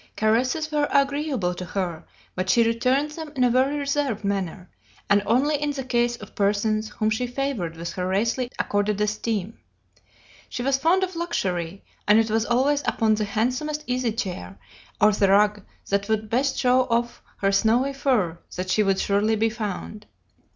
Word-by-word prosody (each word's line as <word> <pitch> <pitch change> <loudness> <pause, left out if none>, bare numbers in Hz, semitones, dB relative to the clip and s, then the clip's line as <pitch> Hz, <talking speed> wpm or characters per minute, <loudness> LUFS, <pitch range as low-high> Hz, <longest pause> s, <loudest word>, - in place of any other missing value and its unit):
Caresses 255 +8 +1
were 295 -1 +1
agreeable 280 - +1
to 180 - -6
her, 180 -3 -3 0.3
but 185 0 -3
she 235 - +5
returned 255 +6 +1
them 315 -1 -7
in 255 - +2
a 245 - +4
very 265 +4 +2
reserved 280 -6 -1
manner, 195 -2 -3 0.4
and 205 0 +5
only 280 +6 +2
in 295 - 0
the 270 -1 -4
case 240 -1 +1
of 210 -4 -12
persons 215 +2 0
whom 215 +1 -1
she 245 +3 -1
favored 245 -11 -3
with 170 +1 -5
her 180 0 -3
rarely 230 +6 0
accorded 205 0 0
esteem. 210 0 -2 0.9
She 245 - -4
was 270 +1 +1
fond 345 +6 +3
of 370 -1 -3
luxury, 195 - -2 0.2
and 210 +1 +6
it 225 -1 +2
was 225 +1 +1
always 275 +4 +2
upon 220 -1 +2
the 215 0 0
handsomest 255 +9 -1
easy 250 -2 0
chair, 180 - -5 0.4
or 210 0 +6
the 200 -1 +2
rug 205 +1 +4 0.3
that 200 +1 0
would 220 -1 -1
best 265 +4 +1
show 255 0 +3
off 235 0 -1 0.2
her 195 0 +1
snowy 235 +7 +2
fur, 220 - 0 0.2
that 185 +1 -3
she 215 - +3
would 195 -2 +2
surely 205 +2 +1
be 225 +1 +1
found. 210 -1 -5
225 Hz, 175 wpm, -24 LUFS, 200-265 Hz, 0.9 s, and